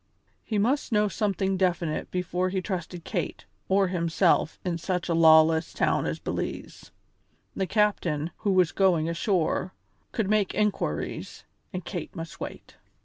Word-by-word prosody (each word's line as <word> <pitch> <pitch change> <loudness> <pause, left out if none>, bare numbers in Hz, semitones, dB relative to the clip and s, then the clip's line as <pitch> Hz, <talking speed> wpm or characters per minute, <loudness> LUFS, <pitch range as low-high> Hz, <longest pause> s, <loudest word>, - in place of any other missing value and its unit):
He 215 - -2
must 250 +8 +1
know 210 -1 +3
something 195 -2 0
definite 175 -4 0
before 180 0 -1
he 190 0 -1
trusted 180 -2 -5
Kate - - -4 0.2
or 195 0 +3
himself 170 -2 +1
in 170 -2 -1
such 180 0 -2
a - - +2
lawless 160 0 +5
town - - +1
as - - -2
Belize. - - -5 0.7
The 190 - -1
captain, 175 -7 +1
who 205 - 0
was 185 -3 +4
going 175 -5 +2
ashore, 180 +1 0 0.4
could 220 -4 -1
make 210 -2 +1
inquiries, 210 -1 -2 0.3
and 185 -4 -5
Kate 175 -3 -6
must 165 -2 -7
wait. - - -8
185 Hz, 145 wpm, -27 LUFS, 165-200 Hz, 0.7 s, lawless